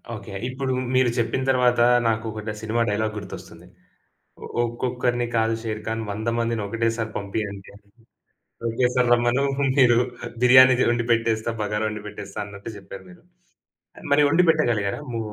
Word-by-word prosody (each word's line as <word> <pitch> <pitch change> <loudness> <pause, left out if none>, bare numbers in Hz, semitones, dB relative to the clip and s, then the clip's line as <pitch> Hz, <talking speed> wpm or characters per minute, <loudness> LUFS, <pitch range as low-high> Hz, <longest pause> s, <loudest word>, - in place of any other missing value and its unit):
Okay 105 -1 -10 0.2
ఇప్పుడు 130 +1 -3 0.2
మీరు 130 -1 +4
చెప్పిన 120 +2 0
తర్వాత 125 -2 +3 0.3
నాకు 115 0 0
ఒక 110 0 -6
డ - - -1
సినిమా 110 +1 -1
డైలాగ్ 110 +1 -1
గుర్తొస్తుంది. 100 -2 -10 1.0
"ఒక్కొక్కరిని 120 0 -1
కాదు 115 0 +2
షేర్ఖాన్ 110 0 -4
వందమందిని 115 +1 -2
ఒకటేసారి 115 +1 -2
పంపియండి" 100 -1 -5
అని. 100 0 -19 0.8
ఒకేసారి 125 +1 +1
రమ్మను. 120 +3 +1 0.3
మీరు 120 -3 +5 0.4
బిర్యానీ 130 0 +7
ది - - +3
వండి 120 -1 0
పెట్టేస్తా. 115 0 0
బగారా 105 +1 -2
వండి 105 -1 -6
పెట్టేస్తా 100 -1 -8
అన్నట్టు 100 +2 -9
చెప్పారు 100 0 -11
మీరు. 180 -1 -17 0.9
మరి 150 - +5
వండి 170 +4 +4
పెట్టగలిగారా 120 -9 0
ము 115 - -3
115 Hz, 135 wpm, -23 LUFS, 105-125 Hz, 1.0 s, బిర్యానీ